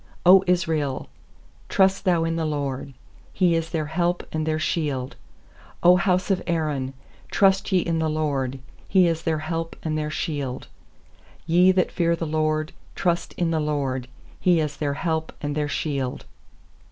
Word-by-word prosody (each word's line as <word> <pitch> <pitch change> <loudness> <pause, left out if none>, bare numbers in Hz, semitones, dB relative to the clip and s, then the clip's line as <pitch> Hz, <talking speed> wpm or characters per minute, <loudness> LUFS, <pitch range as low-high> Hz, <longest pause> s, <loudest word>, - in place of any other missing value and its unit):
90 185 0 +7
Israel, 155 - -1 0.6
trust 190 +1 +3
thou 175 -3 +3
in 165 0 -1
the 165 - -1
LORD! 140 -3 -3 0.4
He 180 -3 +2
is 165 0 -1
their 160 -3 -2
help 175 +3 -1
and 155 0 -1
their 155 0 +1
shield! 150 -5 -2 0.7
100 180 +1 +7
house 185 +1 +2
of 185 -2 +1
Aaron, 150 -6 -1 0.3
trust 195 0 +3
ye 185 -2 +4
in 165 -1 -1
the 160 -1 +1
LORD! 140 -4 -1 0.3
He 185 -2 +5
is 165 -1 0
their 160 -1 0
help 165 0 -3
and 155 -1 -1
their 150 0 -1
shield! 145 -5 -3 0.8
nYe 180 +3 +5
that 185 - +2
fear 170 -1 +1
the 165 - -4
LORD, 155 0 0 0.2
trust 175 -2 0
in 170 -2 -1
the 160 - +1
LORD! 140 -4 -1 0.3
He 175 -2 +3
is 150 -2 -2
their 145 -2 -1
help 160 0 -2
and 145 0 -3
their 150 -1 -1
shield. 140 -4 -2
160 Hz, 165 wpm, -24 LUFS, 150-175 Hz, 0.8 s, 90